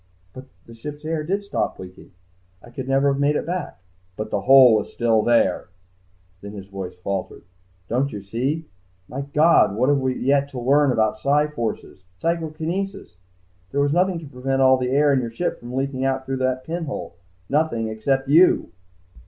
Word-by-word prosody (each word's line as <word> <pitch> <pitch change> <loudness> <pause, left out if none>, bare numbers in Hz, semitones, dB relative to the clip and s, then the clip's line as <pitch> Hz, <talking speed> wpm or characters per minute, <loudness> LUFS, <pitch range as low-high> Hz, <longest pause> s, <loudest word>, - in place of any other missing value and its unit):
"But 130 - -10 0.2
the 115 - -13
ship's 145 +6 -9
air 160 -1 -2
did 195 +6 -2
stop 200 - -2
leaking. 95 +1 -12 0.5
I 120 - -14
could 130 +1 -6
never 135 +1 +3
have 140 +1 -1
made 145 +1 +2
it - - -1
back...." 175 - -4 0.4
"But 110 - -5
the 100 - 0
hole 130 +1 +7
was 105 -1 0
still 115 -2 +2
there!" 115 -5 +2 0.7
Then 100 +1 -9
his 100 -2 -8
voice 95 -2 -7
faltered. 95 +1 -5 0.4
"Don't 130 +4 0
you 100 -2 -7
see? 130 +10 -2 0.4
My 135 - -5
God, 140 -7 +3
what 130 +6 +3
we 130 -2 0
have - - -8
yet 140 +1 +2
to 135 -3 -6
learn 140 +3 +3
about 110 -2 +1
psi 145 +4 +2
forces, 115 -8 -5
psychokinesis.... 165 - -3 0.5
There 140 - 0
was 145 0 +1
nothing 180 +1 +2
to 165 - -8
prevent 135 0 -3
all 130 0 +5
the 125 -1 -2
air 145 +2 +3
in 130 - +2
your 120 - -4
ship 175 +10 -3
from 120 +1 -8
leaking 135 0 -2
out 135 0 -1
through 135 0 -3
that 130 0 -1
pinhole, 160 - -5 0.3
nothing 140 -6 0
except 135 +5 -1
you." 160 - +4
135 Hz, 185 wpm, -22 LUFS, 115-150 Hz, 0.7 s, hole